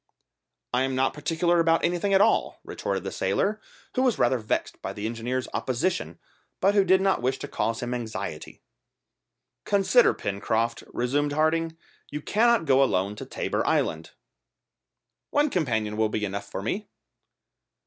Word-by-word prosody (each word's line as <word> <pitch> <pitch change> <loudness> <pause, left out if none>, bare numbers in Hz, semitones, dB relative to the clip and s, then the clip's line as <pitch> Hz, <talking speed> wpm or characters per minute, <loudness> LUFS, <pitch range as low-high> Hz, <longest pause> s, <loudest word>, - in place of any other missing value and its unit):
"I 125 - +2
am 130 0 0
not 130 +1 +1
particular 165 +3 +1
about 165 0 +3
anything 175 +3 0
at 195 0 +5
all," - - +2
retorted - - -3
the - - -4
sailor; - - 0 0.3
who 255 - +1
was 255 -3 +2
rather 130 - +2
vexed 105 - -2
by - - -4
the 105 - -5
engineer's 120 +3 -2
opposition, 120 - -1 0.4
but 200 - +3
who 200 -1 +5
did 190 0 +4
not 195 -7 +2
wish 130 +2 0
to - - -6
cause 115 +1 -2
him 120 0 -2
anxiety. 120 -3 -6 1.0
"Consider, 205 +5 +4
Pencroft," 110 +4 -1
resumed 145 +4 0
Harding, 160 +2 +1 0.3
"you 150 - -4
cannot 225 +3 +2
go 135 -2 +4
alone 100 -4 0
to - - -7
Tabor - - -2
Island." 80 +1 0 1.2
"One 295 0 +2
companion 110 - -1
will 110 -1 +2
be 105 0 -1
enough 100 0 -5
for 95 - -5
me." 200 - -3
135 Hz, 155 wpm, -26 LUFS, 110-180 Hz, 1.2 s, at